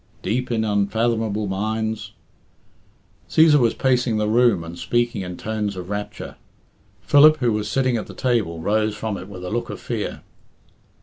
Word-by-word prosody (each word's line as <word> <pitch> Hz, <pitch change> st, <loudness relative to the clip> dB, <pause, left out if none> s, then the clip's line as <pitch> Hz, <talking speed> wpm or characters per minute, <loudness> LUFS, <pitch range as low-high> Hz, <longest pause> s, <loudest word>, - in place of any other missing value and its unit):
'Deep 125 Hz, +6 st, -1 dB
in 115 Hz, -2 st, 0 dB
unfathomable 110 Hz, +1 st, 0 dB
mines' 110 Hz, +1 st, -3 dB, 0.6 s
" -, -, -36 dB
Cæsar 155 Hz, -2 st, +5 dB
was 120 Hz, -3 st, +2 dB
pacing 125 Hz, -4 st, +1 dB
the 105 Hz, 0 st, 0 dB
room 115 Hz, -5 st, +3 dB
and 85 Hz, +1 st, -8 dB
speaking 120 Hz, +5 st, -1 dB
in 90 Hz, -1 st, -6 dB
tones 105 Hz, -2 st, -3 dB
of 90 Hz, +1 st, -7 dB
rapture. 105 Hz, 0 st, -6 dB, 0.6 s
Philip, 150 Hz, -, +6 dB
who 120 Hz, -5 st, +1 dB
was 105 Hz, 0 st, -2 dB
sitting 130 Hz, -3 st, +1 dB
at 110 Hz, -, -5 dB
the -, -, -11 dB
table, 110 Hz, -10 st, 0 dB
rose 105 Hz, +3 st, 0 dB
from 105 Hz, 0 st, -3 dB
it 95 Hz, -, -8 dB
with 90 Hz, -2 st, -8 dB
a 90 Hz, -, -5 dB
look 120 Hz, +2 st, -2 dB
of -, -, -6 dB
fear. -, -, -4 dB
110 Hz, 170 wpm, -22 LUFS, 100-120 Hz, 0.6 s, Philip